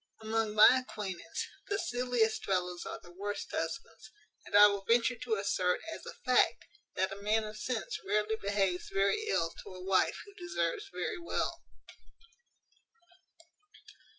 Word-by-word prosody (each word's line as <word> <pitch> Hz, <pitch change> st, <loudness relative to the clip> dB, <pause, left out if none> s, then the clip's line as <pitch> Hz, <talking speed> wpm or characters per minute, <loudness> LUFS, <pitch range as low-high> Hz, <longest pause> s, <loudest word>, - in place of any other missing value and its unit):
Among 220 Hz, -1 st, -1 dB
my 235 Hz, +4 st, +8 dB
acquaintance, 195 Hz, -7 st, -5 dB, 0.2 s
the 405 Hz, -, 0 dB
silliest 245 Hz, -, 0 dB
fellows 180 Hz, -2 st, -1 dB
are -, -, -5 dB
the 175 Hz, -, -14 dB
worst 205 Hz, +3 st, -5 dB
husbands; 220 Hz, +7 st, -4 dB, 0.4 s
and -, -, -4 dB
I 205 Hz, 0 st, +11 dB
will 200 Hz, -1 st, +2 dB
venture 235 Hz, +2 st, +3 dB
to 230 Hz, -1 st, -1 dB
assert, 185 Hz, -3 st, +1 dB
as -, -, -9 dB
a -, -, -7 dB
fact, 250 Hz, -2 st, +3 dB, 0.3 s
that 190 Hz, +1 st, 0 dB
a 200 Hz, +1 st, -7 dB
man 215 Hz, +2 st, +2 dB
of 215 Hz, 0 st, -7 dB
sense 220 Hz, +1 st, -3 dB
rarely 210 Hz, +2 st, +1 dB
behaves 195 Hz, -3 st, 0 dB
very 200 Hz, -, +1 dB
ill 165 Hz, -, +1 dB
to 185 Hz, -, -10 dB
a 180 Hz, -, -9 dB
wife 190 Hz, -1 st, +2 dB
who 405 Hz, -, -15 dB
deserves 395 Hz, +2 st, -2 dB
very 415 Hz, -5 st, -3 dB
well." 340 Hz, -, -2 dB
210 Hz, 150 wpm, -32 LUFS, 195-245 Hz, 0.4 s, I